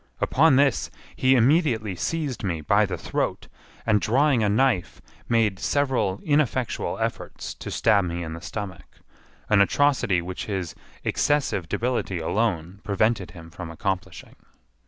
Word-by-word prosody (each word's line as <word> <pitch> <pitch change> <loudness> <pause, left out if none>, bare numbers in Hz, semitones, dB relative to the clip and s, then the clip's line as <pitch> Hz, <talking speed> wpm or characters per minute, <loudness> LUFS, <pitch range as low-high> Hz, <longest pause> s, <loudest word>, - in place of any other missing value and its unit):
Upon 145 0 +4
this 140 -2 +2 0.3
he 130 +1 +4
immediately 120 - +2
seized 145 - -3
me 85 -5 -2
by 100 +6 +3
the 90 -2 -4
throat, - - -3 0.4
and 105 -2 +3
drawing 135 +2 +3
a 105 - +2
knife, 110 -3 +1 0.3
made 110 -5 +2
several 130 -9 0
ineffectual 145 -5 0
efforts - - -4
to - - -8
stab 105 -4 +3
me 85 0 -3
in 80 -1 -5
the 85 - -8
stomach; 95 -3 -7 0.5
an 105 -2 +4
atrocity 125 -4 +2
which 90 +2 -5
his 95 -5 -3 0.3
excessive 105 - 0
debility 120 -6 -1
alone 90 +1 -1
prevented 105 -1 +1
him 80 0 -11
from 85 -1 -7
accomplishing. 90 +3 -4
105 Hz, 135 wpm, -25 LUFS, 90-130 Hz, 0.5 s, Upon